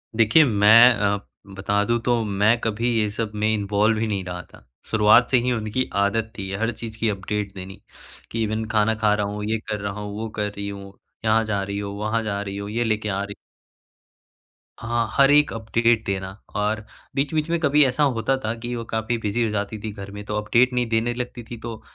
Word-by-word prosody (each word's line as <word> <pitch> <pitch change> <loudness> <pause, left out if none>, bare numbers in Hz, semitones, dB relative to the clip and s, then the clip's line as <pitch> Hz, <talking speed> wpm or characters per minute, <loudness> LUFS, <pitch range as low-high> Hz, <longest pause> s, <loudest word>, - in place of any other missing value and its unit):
देखिए 115 +8 +6
मैं 105 -2 +6 0.2
अ, 100 -1 0 0.4
बता 100 +1 0
दूँ 120 0 +1
तो 120 -1 +1
मैं 105 +3 +2
कभी 115 +2 -1
ये 105 - +1
सब 110 0 -3
में 105 +1 0
इन्वॉल्व 105 +1 +1
ही 115 - 0
नहीं 100 -3 -2
रहा 90 -1 -5
था। - - -17 0.3
शुरुआत 110 +2 +5
से 130 - +6
ही 125 - 0
उनकी 115 +2 -1
आदत 110 +2 0
थी 95 -1 -5
हर 115 +4 0
चीज़ 110 -1 -8
की 115 - +1
अपडेट 100 0 -3
देनी 95 0 -9 0.5
कि 115 0 -1
इवेन 110 +1 -2
खाना 110 0 +2
खा 105 -1 +2
रहा 105 0 0
हूँ, 105 +1 -5
ये 110 +1 0
कर 105 -1 -2
रहा 100 -1 -3
हूँ। 105 0 -5
वो 110 0 -4
कर 105 -1 -1
रही 100 0 -5
हो, 100 -1 -10 0.3
यहाँ 110 +1 +3
जा 100 -2 -1
रही 100 +1 -4
हो, 100 -1 -4
वहाँ 110 +2 -1
जा 100 -1 -2
रही 100 -1 -5
हो, 100 0 -5
ये 115 +3 -1
लेके 110 -2 -1
आ 100 0 -1
रही 100 0 -7 1.4
हाँ, 115 0 -1
हर 140 0 +5
एक 150 0 +5
अपडेट 115 0 +1
देना 95 -1 -2 0.3
और 105 +1 0 0.4
बीच-बीच 150 +3 0
में 170 - +1
कभी 150 -1 +5
ऐसा 130 +3 +1
होता 130 +4 +1
था 110 - 0
कि 120 +1 -4
वो 115 - -4
काफ़ी 110 +1 -2
बिज़ी 110 +2 -1
हो 110 - 0
जाती 105 +1 -3
थी 110 - -4
घर 100 -1 -9
में, 105 0 -8
तो 105 - -4
अपडेट 120 +4 +2
नहीं 125 -1 0
देने 115 +1 +1
लगती 120 -1 -5
थी। 120 - -6
तो 115 -1 -7
110 Hz, 220 wpm, -23 LUFS, 100-115 Hz, 1.4 s, देखिए